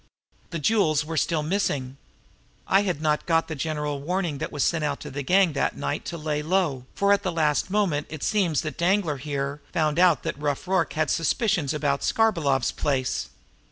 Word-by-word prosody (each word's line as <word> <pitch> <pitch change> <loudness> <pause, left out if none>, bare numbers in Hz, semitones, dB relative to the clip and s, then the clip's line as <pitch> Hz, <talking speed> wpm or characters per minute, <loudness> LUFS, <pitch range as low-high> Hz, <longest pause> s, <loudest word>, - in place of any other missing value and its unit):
The 170 - -4
jewels 155 -4 +2
were 165 +1 -5
still 155 0 +1
missing. 145 -7 -1 0.7
I 195 - +4
had 180 -6 -2
not 150 -1 +1
got 165 -1 +2
the 160 - -4
general 150 -1 -3
warning 170 -2 -2
that - - -4
was 145 -2 -1
sent 165 -2 +1
out 145 -1 -1
to - - -7
the 145 +2 -4
gang 180 +3 +3
that 140 - -1
night - - -3
to 170 - -5
lay 150 -1 -2
low, 155 -6 0
for 200 0 +3
at 200 - +2
the 190 -3 -2
last 155 0 +1
moment 185 -8 0
it 155 -2 -7
seems 185 -9 +1
that 155 - -6
Danglar 175 -4 +2
here 140 +1 -3
found 155 -1 +1
out 175 -6 +4
that - - -4
Rough 145 +3 -2
Rorke 185 -2 +1
had 155 0 0
suspicions 170 - +1
about 145 -2 0
Skarbolov's 160 - +2
place." 130 -3 -1
155 Hz, 195 wpm, -25 LUFS, 145-180 Hz, 0.7 s, I